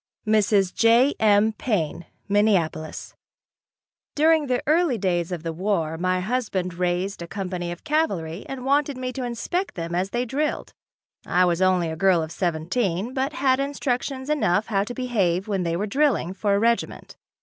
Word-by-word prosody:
Mrs. 205 -3 +2
J. 235 +5 +4
M. 215 0 +4
Paine, 175 - -2 0.2
Minneapolis. 195 -7 0 1.0
During 315 0 +3
the 250 -1 0
early 310 -4 +2
days 175 -3 -1
of 170 -3 -4
the 165 -1 -3
war 170 -3 -1
my 185 +2 0
husband 195 -5 -2
raised 180 +2 -2
a 170 - -6
company 180 -2 -4
of 175 - -8
cavalry 200 - -1
and 260 -2 -6
wanted 280 0 +1
me 255 0 -4
to 260 - -4
inspect 245 - -3
them 170 -1 -4
as 185 +2 0
they 240 +3 -1
drilled. 290 +5 -2 0.5
I 180 +1 +3
was 175 0 0
only 180 -3 +2
a - - -4
girl 180 -1 +3
of 160 - -7
seventeen, 180 +6 -1
but 270 +2 -1
had 270 -6 +2
instructions 270 -1 -2
enough 220 -10 +1
how 200 -3 0
to 245 - -6
behave 200 -8 0
when 195 -3 -1
they 170 -1 -1
were 200 +5 -1
drilling, 235 - +1
for 200 0 0
a - - +2
regiment. 235 +2 -1
205 Hz, 170 wpm, -24 LUFS, 175-255 Hz, 1.0 s, J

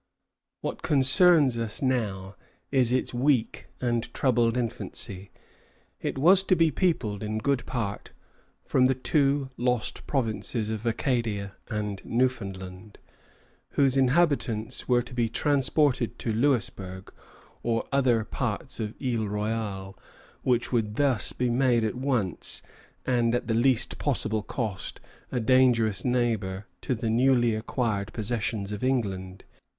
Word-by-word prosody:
What - - -4
concerns 140 -1 +5
us 115 +2 -3
now 105 -8 -1 0.4
is 130 -4 +3
its 130 0 0
weak 125 -1 +1
and 120 -2 -1
troubled 120 -2 +2
infancy. 100 -5 -4 0.7
It - - -3
was 180 +8 +6
to 185 - +4
be 165 -2 +3
peopled 130 - 0
in 110 0 -3
good 135 +3 0
part 105 -5 -3 0.6
from 130 -1 +3
the 130 - +1
two 140 0 +1
lost 125 -2 -1
provinces 115 -3 -1
of 110 +1 -4
Acadia 110 -5 -1 0.2
and 105 -2 -3
Newfoundland, 100 -5 -3 0.8
whose 135 -2 +3
inhabitants 135 -5 +1
were 120 -1 +3
to 120 - -12
be 120 -2 0
transported 140 -1 +1
to 115 - -2
Louisbourg 100 -7 -1 0.5
or 115 -1 -1
other 125 -5 +3
parts 125 +5 -4
of 110 -1 -4
Isle 120 -5 -1
Royale, 105 -2 -3 0.5
which 125 -2 +1
would 110 -4 0
thus 135 -5 +1
be 125 -1 -1
made 120 -2 +3
at 110 - 0
once 125 - -2 0.4
and 120 -2 +2
at 120 - -1
the 115 - -1
least 120 +1 +2
possible 110 -6 0
cost 105 -4 -4 0.3
a 125 - 0
dangerous 115 -5 +3
neighbor 110 -6 0 0.2
to 130 - -1
the 115 -1 -2
newly 120 -1 +3
acquired 110 -2 -2
possessions 110 -2 -2
of 105 +2 -5
England. 95 -8 -2
120 Hz, 130 wpm, -27 LUFS, 105-130 Hz, 0.8 s, was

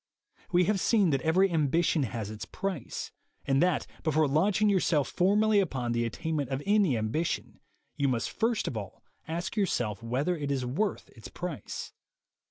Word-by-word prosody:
We 180 0 +4
have 195 +2 +1
seen 200 -4 +3
that 135 -2 +1
every 180 +6 +3
ambition 160 +1 +2
has 110 -4 -3
its 110 - -7
price, 190 -10 -4 0.3
and 135 0 +2
that, 180 -3 +2 0.2
before 155 -1 +2
launching 190 +9 +2
yourself 170 -8 +2
formally 205 +3 +3
upon 130 -10 -1
the 120 0 +1
attainment 145 +3 -2
of 135 +1 -3
any 200 - +3
ambition, 110 +10 -2 0.4
you 140 -2 +2
must 120 -4 -1
first 225 -1 0
of - - -3
all 105 -3 -7 0.2
ask 170 +5 -3
yourself 120 - 0
whether 130 +10 0
it 145 -3 -4
is 135 -3 -1
worth 180 +12 -2
its 110 - -11
price. 175 -4 -6
155 Hz, 165 wpm, -29 LUFS, 130-185 Hz, 0.4 s, We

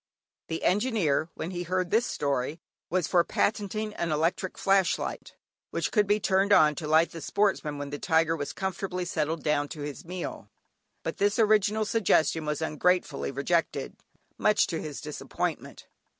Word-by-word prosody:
The 160 - -4
Engineer, 185 - +1
when 170 - -4
he 175 -1 -4
heard 185 0 -1
this 230 +3 +3
story 140 +2 -1 0.3
was 180 -2 +1
for 175 -2 +3
patenting 215 +2 -1
an 170 -5 -2
electric 165 +5 0
flash 195 -2 +3
light, - - -6 0.3
which - - -2
could 210 -3 +3
be 205 +1 +3
turned 195 0 +2
on 155 -6 +6
to 150 +1 -5
light 160 +2 +4
the 165 - -8
Sportsman 165 -5 0
when 145 0 -5
the 145 - -4
tiger 165 -1 +2
was 145 -3 -4
comfortably 190 -1 -3
settled 160 -1 -2
down 150 -1 +1
to 150 0 -8
his 145 -1 -6
meal, 180 +1 -6 0.5
but - - -4
this 205 +1 +2
original 215 -1 +3
suggestion 165 -8 +2
was 150 +1 -1
ungratefully 165 -1 0
rejected, 140 +5 -1 0.4
much 210 - +4
to 165 -3 -3
his 150 -2 -6
disappointment. 150 -1 -4
170 Hz, 165 wpm, -28 LUFS, 155-195 Hz, 0.5 s, on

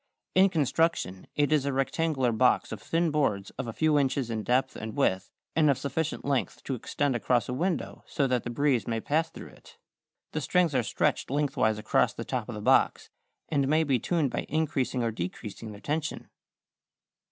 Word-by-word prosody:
In 190 +1 +6
construction 155 - 0
it 145 0 +2
is 150 -3 +3
a 140 - -1
rectangular 135 -1 0
box 125 +2 +2
of - - -6
thin 165 0 0
boards 120 -10 0
of - - -5
a - - -3
few 150 +4 +2
inches 135 -3 0
in 110 -1 -2
depth 130 +4 +1
and 110 +5 -6
width 95 -9 +1 0.3
and 155 -2 +4
of 140 - +3
sufficient 155 +3 -3
length 140 -2 -1
to 135 - -3
extend 135 +2 -1
across 120 0 +1
a 125 - -3
window 170 +6 -2
so 145 -5 0
that 125 -3 +1
the - - -4
breeze 130 -3 +1
may 115 -1 -1
pass 160 +7 0
through - - -10
it. - - -18 0.5
The 155 - -2
strings 170 +3 +2
are 130 - +3
stretched 110 - 0
lengthwise 135 -6 +1
across 105 +1 +2
the - - -5
top - - -3
of - - -5
the - - -6
box, - - +2 0.4
and 140 -3 +1
may 155 +3 +3
be 135 -5 +1
tuned 155 -1 0
by - - -3
increasing 140 -5 0
or 115 - 0
decreasing 105 +3 -6
their 100 0 -11
tension. 155 +1 -3
135 Hz, 195 wpm, -28 LUFS, 120-155 Hz, 0.5 s, In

